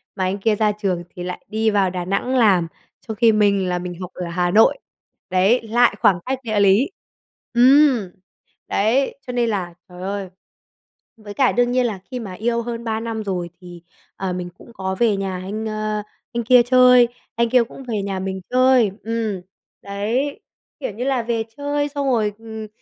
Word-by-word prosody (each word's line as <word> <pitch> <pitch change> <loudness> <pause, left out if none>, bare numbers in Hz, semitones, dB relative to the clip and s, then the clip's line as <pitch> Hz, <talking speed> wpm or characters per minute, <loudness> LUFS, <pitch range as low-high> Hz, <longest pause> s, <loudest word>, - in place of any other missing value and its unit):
mà 190 - -2
anh 185 +2 -1
kia 215 +2 +2
ra 210 0 +2
trường 195 -4 -2
thì 175 - -8
lại 180 0 -6
đi 220 +1 0
vào 200 -3 +2
Đà 180 -1 -4
Nẵng 200 +8 -1
làm, 190 -8 +4 0.4
trong 220 - -4
khi 230 0 +5
mình 200 -3 +2
là 180 0 -1
mình 175 0 -6
học 180 0 -6
ở 180 - -5
Hà 175 +1 0
Nội. 220 - +5 0.5
Đấy, 190 +7 +3
lại 240 -1 +3
khoảng 180 -3 +4
cách 265 0 -2
địa 215 -3 0
lý. 200 - +4 0.6
Ừm, 250 -4 +5 0.6
đấy, 235 +7 +1
cho 250 - -4
nên 240 -1 +1
là 185 -5 -3 0.2
trời 180 0 -11
ơi. 195 0 -4 0.9
Với 210 -2 -10
cả 260 +3 +3
đương 245 0 +1
nhiên 250 0 +2
là 215 -5 -2
khi 250 - -4
mà 205 -6 -7
yêu 235 +4 -1
hơn 235 0 -5
3 220 -1 -1
năm 225 -1 -4
rồi 180 -4 -3
thì, 175 -1 -12 0.3
ờ, 190 -1 -3
mình 180 0 -4
cũng 235 - -16
có 190 -2 -3
về 225 -4 +3
nhà 195 -1 -3
anh, 215 +4 -4
ơ, 215 0 -2 0.3
anh 235 0 -1
kia 245 +1 +6
chơi, 250 0 +6 0.3
anh 235 0 +1
kia 250 0 +4
cũng 250 +3 -11
về 215 -3 -1
nhà 195 -1 -3
mình 190 0 -4
chơi. 255 -4 +4
Ừm, 225 -4 -2 0.4
đấy, 225 +8 -2 0.4
kiểu 270 - -3
như 220 +5 -5
là 265 -2 +1
về 230 -1 -1
chơi 290 0 -1
xong 285 -1 -3
rồi, 220 -5 +1
ừm, 220 -1 -8
215 Hz, 195 wpm, -21 LUFS, 190-240 Hz, 0.9 s, kia